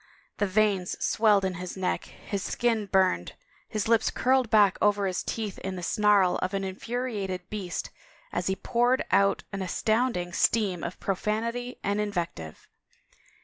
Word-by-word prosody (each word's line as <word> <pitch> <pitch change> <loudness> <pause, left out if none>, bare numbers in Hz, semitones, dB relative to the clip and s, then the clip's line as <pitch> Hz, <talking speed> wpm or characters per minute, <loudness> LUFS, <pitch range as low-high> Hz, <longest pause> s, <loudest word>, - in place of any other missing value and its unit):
The 205 - +2
veins 195 -2 +1
swelled 210 -3 +3
in 190 - -1
his 180 +1 -6
neck, 185 -1 -1
his 200 -1 -6
skin 225 0 0
burned, 185 - +2 0.4
his 215 -1 -2
lips 225 -1 +3
curled 260 -2 +2
back 205 -4 +4
over 205 -1 +3
his 185 -2 -1
teeth 215 -4 -4
in 190 0 -4
the 180 - -6
snarl 205 -2 +3
of 185 +2 -2
an 195 - -1
infuriated 195 -2 -4
beast 195 -5 -4 0.4
as 175 0 -2
he 190 - +1
poured 240 +6 +1
out 200 0 +3
an 195 - -3
astotmding 205 -1 0
stream 195 -3 +1
of 170 - -5
profanity 230 +5 -2
and 205 +1 0
invective. 170 - -4
200 Hz, 150 wpm, -27 LUFS, 185-220 Hz, 0.4 s, back